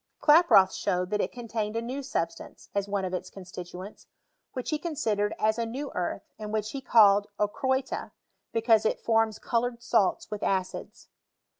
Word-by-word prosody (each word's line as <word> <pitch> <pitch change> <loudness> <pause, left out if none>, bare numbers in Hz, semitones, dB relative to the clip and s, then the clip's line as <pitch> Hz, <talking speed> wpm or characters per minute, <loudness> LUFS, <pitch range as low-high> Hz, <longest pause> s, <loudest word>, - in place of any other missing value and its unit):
KI»proth 295 - +7
showed 180 +1 -1
that 210 - +1
it - - -2
contained 225 -3 -4
a - - +1
new 255 +4 -4
substance, 210 -11 -4
as 200 0 -1
one 200 -1 -1
of 185 - -4
its 185 0 -3
constituents, 185 +1 -9 0.5
which 255 +2 -4
ho 305 - 0
considered 220 -11 -1
as 220 +2 +1
a. 230 - 0
new 270 +5 -5
earth, 180 +2 -2 0.2
aod 210 -1 -5
which 215 0 -1
he 275 - -5
called 205 -4 +5
ochroita, 260 +5 -1 0.4
because 225 -1 +3
it - - 0
forms 225 -1 +2
coloured 235 0 -1
salts 220 -3 +1
with 210 - -4
acids. 190 -1 -3
215 Hz, 165 wpm, -28 LUFS, 200-240 Hz, 0.5 s, KI»proth